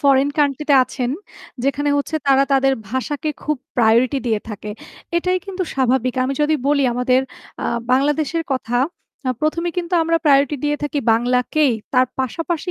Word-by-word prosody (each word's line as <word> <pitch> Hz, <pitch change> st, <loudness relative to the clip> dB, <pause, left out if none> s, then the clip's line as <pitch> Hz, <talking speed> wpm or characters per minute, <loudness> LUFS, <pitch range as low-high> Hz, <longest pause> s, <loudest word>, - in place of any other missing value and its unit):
Foreign 275 Hz, -1 st, +4 dB
country 290 Hz, 0 st, +1 dB
তে -, -, +7 dB
আছেন 250 Hz, -1 st, -3 dB, 0.5 s
যেখানে 290 Hz, +1 st, 0 dB
হচ্ছে 285 Hz, +2 st, -1 dB
তারা 275 Hz, 0 st, +5 dB
তাদের 270 Hz, 0 st, +4 dB, 0.2 s
ভাষাকে 285 Hz, +4 st, -2 dB
খুব 300 Hz, -1 st, -1 dB, 0.2 s
প্রায়োরিটি 240 Hz, +3 st, +3 dB
দিয়ে 220 Hz, -3 st, +1 dB
থাকে। 210 Hz, 0 st, -6 dB, 0.5 s
এটাই 365 Hz, +2 st, +1 dB
কিন্তু 380 Hz, -1 st, -3 dB
স্বাভাবিক। 255 Hz, -1 st, +1 dB
আমি 265 Hz, -, -1 dB
যদি 310 Hz, +1 st, +2 dB
বলি 285 Hz, -2 st, +3 dB
আমাদের 250 Hz, +1 st, +2 dB, 0.4 s
আ -, -, 0 dB, 0.3 s
বাংলাদেশের 295 Hz, +4 st, +1 dB
কথা 245 Hz, -2 st, -1 dB, 0.6 s
১ম 310 Hz, +2 st, 0 dB
এই 340 Hz, -, -6 dB
কিন্তু 350 Hz, +1 st, -2 dB
আমরা 330 Hz, +1 st, +2 dB
প্রায়োরিটি 285 Hz, 0 st, +4 dB
দিয়ে 295 Hz, 0 st, +1 dB
থাকি 295 Hz, 0 st, -1 dB
বাংলাকেই 250 Hz, +4 st, +2 dB, 0.2 s
তার 255 Hz, 0 st, +5 dB
পাশাপাশি 330 Hz, +6 st, -2 dB
275 Hz, 155 wpm, -20 LUFS, 255-305 Hz, 0.6 s, তে